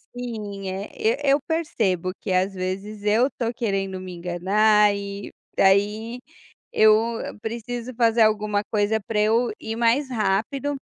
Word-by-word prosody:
Sim. 210 -5 -5
É, 190 +2 -5 0.4
e - - +6
eu 285 - +4
percebo 215 - -1
que, 195 - -4
às 185 +2 +1
vezes, 195 +3 -5
eu 220 +5 +3
tô 235 -1 -3
querendo 195 -5 -2
me 185 -1 -8
enganar 200 +4 +3
e 200 0 -6 0.2
daí 210 +5 +2 0.5
eu 215 0 +6 0.5
preciso 235 +2 -5
fazer 230 -1 +3
alguma 210 -1 +2
coisa 215 +1 +1
para 210 +1 -2
eu 225 +3 +2
ir 220 - -5
mais 240 +4 +2
rápido, 245 +6 -1
215 Hz, 140 wpm, -24 LUFS, 195-230 Hz, 0.5 s, e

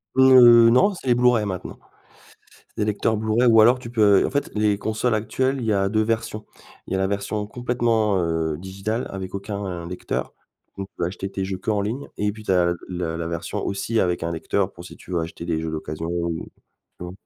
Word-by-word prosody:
Heu, 120 -3 +8
non, 160 - +4
c'est 155 - -10
les 120 - +4
Blu-ray 120 -3 +3
maintenant. 95 -2 -5 0.9
C'est - - -36
des 105 - +1
lecteurs 105 +1 0
Blu-ray 110 +3 +1
ou 115 -1 +6
alors 120 +4 +5
tu 115 -2 -9
peux 105 -4 +4
en - - -4
fait 145 +1 -2
les 105 -1 +1
consoles 110 +2 -1
actuelles, 130 +5 0
il - - -4
y 110 - +2
a 100 -1 +1
2 110 +1 +1
versions. 110 -1 -2 0.4
Il - - -6
y - - +1
a - - -1
la 95 - +1
version 100 +1 -3
complètement, 115 -4 0
heu, 80 -2 -1
digitale 95 +5 -4
avec 95 -1 -7
aucun 100 -4 -5
lecteur, 90 +1 -4 0.4
donc 95 0 -6
on - - -59
peut - - -1
acheter 95 +1 -5
tes 95 - -3
jeux 95 -1 -4
qu'en 105 +1 -1
ligne, 115 +8 -4
et 105 0 -1
puis 110 0 -11
tu - - -3
as 90 -2 +4
l 85 0 +1
le 85 -3 -3
la 85 0 -4
version 85 -1 -4
aussi 110 +3 -1
avec 90 -2 0
un 85 +1 -2
lecteur 95 +4 -1
pour 85 - -12
si - - -11
tu - - -15
veux 85 - +1
acheter 85 +1 -6
des 85 -2 -1
jeux 80 0 -4
d'occasions 80 +1 -5
ou 85 -1 -2 0.6
tu 90 - -7
vois? 90 - -7
100 Hz, 230 wpm, -23 LUFS, 90-115 Hz, 0.9 s, Heu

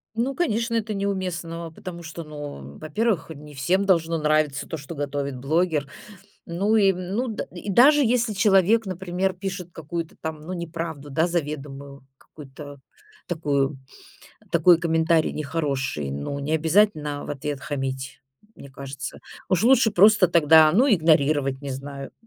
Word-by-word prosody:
Ну, 250 +4 -1
конечно, 230 -8 0
это 220 -1 -1
неуместного, 180 -4 -3
потому 170 +1 -9
что, 165 +1 -7
ну, 145 - -9
во-первых, 190 +2 -1
не 150 0 -13
всем 180 +9 +1
должно 165 -3 +2
нравиться 150 -2 +1
то, 160 - -5
что 145 +2 -9
готовит 140 -3 -3
блогер. 155 +1 0 0.6
Ну 195 +6 +1
и, 200 -3 +5
м, 185 +2 -5
ну, 250 +2 -1
д 220 - -4
и 180 +3 -9
даже 280 +8 +6
если 235 -1 +1
человек, 200 +2 +3
например, 185 0 -2
пишет 180 -2 -6
какую-то 165 +1 -6
там, 160 -1 -5
ну, 170 +4 -7
неправду, 165 -4 -5
да, 160 +5 +2
заведомую, 140 -4 -5
какую-то 145 0 -12 0.5
такую, 145 -4 -1 0.7
такой 170 +1 +5
комментарий 165 -1 +2
нехороший, 140 - -2
ну, 70 - -4
не 140 +2 -3
обязательно 160 -3 +2
в - - -6
ответ 145 0 -4
хамить, 135 -2 -5 0.3
мне 140 - -13
кажется. 135 0 -7 0.3
Уж 185 0 +2
лучше 250 -2 +5
просто 205 0 +6
тогда, 160 -2 +6
ну, 245 +10 +4
игнорировать, 155 - +2
не 140 -1 -6
знаю, 140 +1 -7
160 Hz, 145 wpm, -24 LUFS, 145-190 Hz, 0.7 s, даже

